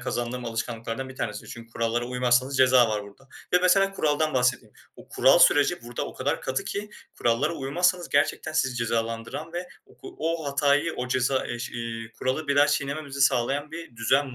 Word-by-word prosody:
kazandığım 120 0 -3
alışkanlıklardan 115 +2 -4
bir 130 - -11
tanesi. 105 -2 -4
Çünkü 115 0 -10
kurallara 115 +1 -1
uymazsanız 125 +2 +1
ceza 130 -2 +5
var 105 -1 -1
burada. 100 +7 -16 0.2
Ve 180 - +6
mesela 195 +2 +4
kuraldan 155 -4 0
bahsedeyim. 125 -3 +1 0.2
Bu - - -15
kural - - +5
süreci 145 +2 +4
burada 120 0 -5
o - - -9
kadar 140 +3 -1
katı 130 0 -2
ki 205 +1 -5 0.3
kurallara 125 +8 +1
uymazsanız 175 +6 0
gerçekten 145 +2 0
sizi 130 -5 0
cezalandıran 115 +6 -3
ve 180 +1 -5 0.3
o - - -10
o 165 -1 -2
hatayı, 145 +3 +2
o 125 0 -3
ceza 130 +1 +1
eş 120 +1 -5
iii, 115 -1 -6
kuralı 130 +4 -2
bir 140 - +1
daha 145 0 +6
çiğnememenizi 140 -1 -2
sağlayan 135 +3 +2
bir 165 -7 -9
düzen 130 +3 +1
130 Hz, 175 wpm, -26 LUFS, 120-145 Hz, 0.3 s, Ve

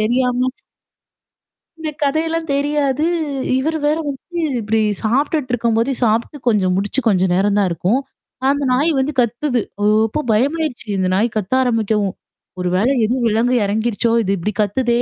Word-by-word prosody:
தெரியாம. 250 +3 +1 1.3
இந்த 315 -1 -3
கதையெல்லாம் 320 +2 -1
தெரியாது. 290 0 0 0.5
இவரு 315 +4 -1
வேற 305 - +2
வந்து 340 +6 -6 0.2
இப்பிடி 220 0 0 0.2
சாப்ட்டுட்டு 270 +3 0
இருக்கும்போத 230 +2 +1
சாப்புட்டு 230 +6 0
கொஞ்சம் 195 -5 +2
முடிச்சு 205 +7 0
கொஞ்சம் 185 -3 +2
நேரம் 200 +2 +2
தான் 200 -2 +3
இருக்கும். 205 +10 0 0.5
அந்த 285 0 +1
நாய் 295 +6 +2
வந்து 265 +3 0
கத்துது. 245 +2 +1 0.2
ஓ! - - 0 0.2
அப்போ 305 +8 -2
பயமாயிருச்சு. 280 +2 0
இந்த 185 -1 +1
நாய் 215 +4 +2
கத்த 210 +3 -2
ஆரம்பிக்கவும். 220 -4 0 0.5
ஒரு 180 - -1
வேள 205 +7 +2 0.2
எதுவும் 245 +2 0
விலங்கு 235 +4 +2
எறங்கிருச்சோ! 220 +2 0
இது 195 - -1
இப்பிடி 210 +5 -3
கத்துதே! 235 +3 +1
240 Hz, 145 wpm, -18 LUFS, 210-280 Hz, 1.3 s, தான்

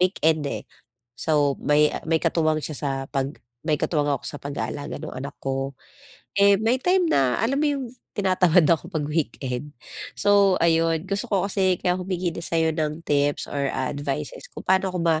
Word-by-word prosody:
weekend, 160 -4 +2
eh. - - -4 0.6
So 145 -3 +1
may, 150 +1 +3
ah, - - -4
may 165 - +4
katuwang 155 -2 +1
siya 155 - -4
sa 145 - -2 0.2
pag 135 -1 0 0.3
may 155 -2 +2
katuwang 150 -3 +1
ako - - -14
sa - - -6
pag-aalaga 145 0 -4
nung 155 - -7
anak 140 +2 -6
ko. 135 0 -2 0.6
Eh, 200 0 +6
may 230 +3 +2
time 360 +1 +3
na, 130 -2 +3
alam 275 +5 +1
mo 305 - +2
'yung 280 -2 -1 0.3
tinatamad 185 -3 +4
ako 165 +2 +2
pag 155 -5 -2
weekend. 145 -2 -3 0.4
So 200 -2 +4
ayon, 165 0 +2
gusto 200 +5 -3
ko 195 -2 +1
kasi 190 -2 +1
kaya 180 +1 0
humingi 180 -1 -2
din 170 0 -6
sa'yo 160 -1 +1
ng 155 +1 -3
tips 145 0 +1
or, 140 -1 -2
ah, 130 +1 -1
advices 145 +1 -4
kung - - -10
paano 190 0 +3
ko - - -1
ma 160 -2 +2
160 Hz, 185 wpm, -24 LUFS, 145-185 Hz, 0.6 s, Eh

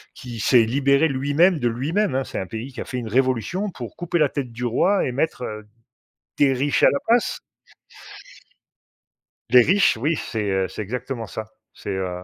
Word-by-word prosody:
qui 120 -4 -8
s'est 115 +1 +4
libéré 140 +5 +3
lui-même 145 +5 +2
de 120 - +1
lui-même, 140 - -1
hein. 135 - +1
C'est - - -5
un 95 - -5
pays 115 +6 -7
qui - - -6
a - - -6
fait 125 - -5
une 120 -2 -4
révolution 130 - 0
pour 120 - -9
couper 175 0 -2
la 150 - +4
tête 135 -3 -5
du 120 +2 -5
roi, 185 - +2
et 125 - -2
mettre 135 -2 -1 0.9
des 140 -2 +4
riches 135 +3 0
à - - +7
la 140 - 0
place. 235 +1 +2 2.1
Les 125 -1 +8
riches, 190 - +3
oui. 150 +8 0
C'est, 105 -6 -3
heu, 95 -1 0
c'est 95 - -7
exactement 120 +1 -5
ça. 110 +2 -6 0.3
C'est, - - -9
heu, 90 -2 -4
130 Hz, 185 wpm, -22 LUFS, 115-145 Hz, 2.1 s, Les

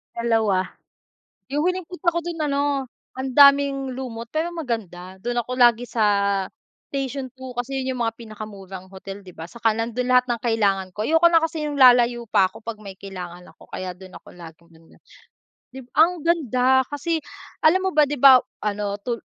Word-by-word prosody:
2 225 -5 +1 0.8
Yung 295 +3 -1
huling 365 -1 -2
punta 360 0 -1
ko 340 - 0
dun 340 -2 -5
ano, 280 -2 0 0.3
ang 260 +1 -4
daming 280 -2 +5
lumot 240 -3 -6
pero 320 +2 -1
maganda. 190 - -6
Dun 240 +1 -3
ako 250 +2 -6
lagi 240 0 +5
sa 200 -4 +1 0.5
Station 270 -1 -3
2 260 -2 -10
kasi 265 +2 -3
yun 260 -1 -3
yung - - -3
mga 225 - -1
pinakamurang 205 -4 -9
hotel, 195 +1 -10
di 180 - -12
ba, 165 +2 -9
tsaka 225 -2 0
nandun 230 +3 -2
lahat 250 0 +4
ng 240 - 0
kailangan 200 -5 +1
ko. 210 - -5
Ayoko 325 +2 +3
na 330 -1 +4
kasi 325 -1 -2
yung 295 - -3
lalayo 240 -3 +5
pa 195 - +4
ako - - -14
'pag 225 -1 -6
may 200 -2 -10
kailangan 180 -2 -9
ako - - -18
kaya 180 -1 -6
dun 185 -1 -13
ako - - -17
laging 170 -1 -14
nandon. 165 - -22 0.7
Dib 260 -1 -11
ang 330 +1 +3
ganda 260 -6 +2
kasi 320 +3 -2 0.4
alam 370 +4 +4
mo 380 - 0
ba, 300 -1 +4
'di 295 - -2
ba, 265 -1 +9 0.2
ano, 205 -1 -2
tul 235 -2 -3
245 Hz, 185 wpm, -23 LUFS, 200-280 Hz, 0.8 s, ba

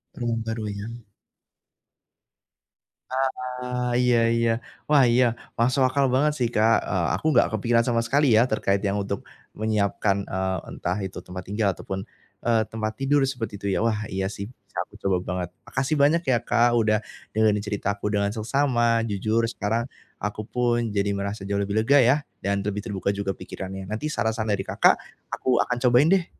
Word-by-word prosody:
Rumah 120 -2 -1
baru 115 -1 -3
ya. 100 +2 -6 2.2
Ah 125 -1 -2
iya 125 -1 +3 0.2
iya. 115 0 +2 0.4
Wah 145 -3 +6
iya 125 +2 +5 0.3
masuk 130 +4 +2
akal 140 +2 +2
banget 145 +4 +3
sih 120 - +2
Kak, 110 +1 +4
eee, - - 0
aku - - -7
nggak - - +5
kepikiran 115 +2 +2
sama 115 -1 +2
sekali 135 -1 +3
ya 115 - +6
terkait 100 -2 +1
yang 100 0 0
untuk 100 0 -3 0.3
menyiapkan, 105 -2 +1
eee, 95 0 -1
entah 90 +2 -3
itu 90 - -12
tempat 90 0 -7
tinggal 105 +1 +1
ataupun, 95 +2 -5 0.4
eee, 115 -2 +3
tempat 110 0 -3
tidur 145 +1 +3
seperti 125 -5 -3
itu 100 - -5
ya, - - +1
wah 105 -2 0
iya 95 0 -1
sih 100 0 -5
bisa - - -17
aku - - -20
coba 95 -2 +1
banget. 90 -1 -3 0.2
Makasih 135 +3 -1
banyak 145 +4 +4
ya 125 -2 +4
Kak 120 0 +3
udah 110 -2 +3 0.3
dengerin 105 -1 +2
cerita 105 -1 -3
aku 105 +1 -3
dengan 100 0 +1
seksama, 120 0 +2
jujur 110 +3 0
sekarang 115 +3 -1 0.3
aku 105 +1 -3
pun 120 -1 0
jadi 100 0 0
merasa 100 +1 -4
jauh 100 0 -1
lebih 100 +1 -1
lega 140 +6 +4
ya, 125 +4 +5 0.3
dan 100 +1 +1
lebih 105 0 -2
terbuka 100 -2 -2
juga 100 -1 -2
pikirannya. 95 0 -7
Nanti 110 +8 -3
saran-saran 110 -3 -1
dari 100 - -1
Kakak - - +4 0.4
aku 125 -2 +1
akan 125 - -2
cobain 125 +4 +5
deh. 190 -3 +3
110 Hz, 175 wpm, -25 LUFS, 100-125 Hz, 2.2 s, Wah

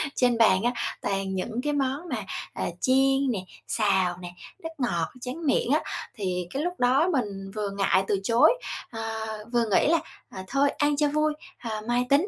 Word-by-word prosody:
Trên 245 -2 +3
bàn 200 -5 +5
á 240 +1 +2 0.3
toàn 195 -1 -1
những 220 +5 -3
cái 295 - 0
món 285 +4 -1
mà, - - -1 0.4
ờ, - - -3 0.2
chiên 270 0 +3
nè, 215 - -1 0.3
xào 190 -5 +2
nè, 175 - -6 0.3
nước 325 - -3
ngọt, 175 - 0
tráng 260 +7 -5
miệng 270 -3 +2
á, 300 - +4 0.3
thì 180 -4 -2
cái 275 - -1
lúc 355 +1 -1
đó 265 +8 +4
mình 200 -7 -2
vừa 210 -1 -1
ngại 195 -1 +2
từ 200 - +1
chối, 230 - +5 0.4
ờ, 225 -1 -5 0.5
vừa 240 -1 +3
nghĩ - - +4
là, 330 +2 +4 0.3
ờ, 190 - -7
"Thôi, 275 +5 +3
ăn 290 0 +2
cho 295 0 +3
vui, 305 +1 +1 0.3
ờ, 220 -3 -4
mai 245 +1 +2
tính," 290 +8 +4
245 Hz, 190 wpm, -26 LUFS, 195-280 Hz, 0.5 s, bàn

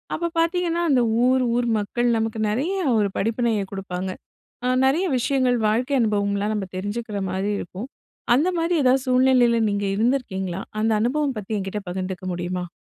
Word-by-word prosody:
அப்ப 340 0 -2
பார்த்தீங்கன்னா, 340 0 +1
அந்த 250 -2 +4 0.2
ஊர், 260 0 +3
ஊர் 245 - 0
மக்கள் 240 +4 0
நமக்கு 225 0 -2
நிறைய 280 - -1 0.2
ஒரு 205 -2 +1
படிப்பினையை 225 -1 0
கொடுப்பாங்க. 190 -1 -4 0.6
அ - - 0 0.2
நிறைய 305 +8 +2
விஷயங்கள் 255 -1 +1
வாழ்க்கை 250 +6 +1
அனுபவம்லாம் 205 -1 0
நம்ம 200 -3 -3
தெரிஞ்சுக்கிற 205 +2 -4
மாதிரி 190 +2 -1
இருக்கும். 195 +8 -7 0.5
அந்த 305 +7 +2
மாதிரி 335 +1 +1
எதாவது 260 +1 +3
சூழ்நிலையில, 250 -2 +4
நீங்க 200 0 -1
இருந்திருக்கீங்களா? 195 -6 -1 0.2
அந்த 220 +1 +2
அனுபவம் 270 +3 0
பத்தி 210 +1 -5
என்கிட்ட 195 +1 -4
பகிர்ந்துக்க 185 0 -4
முடியுமா? 180 +1 -3
225 Hz, 150 wpm, -23 LUFS, 200-260 Hz, 0.6 s, அந்த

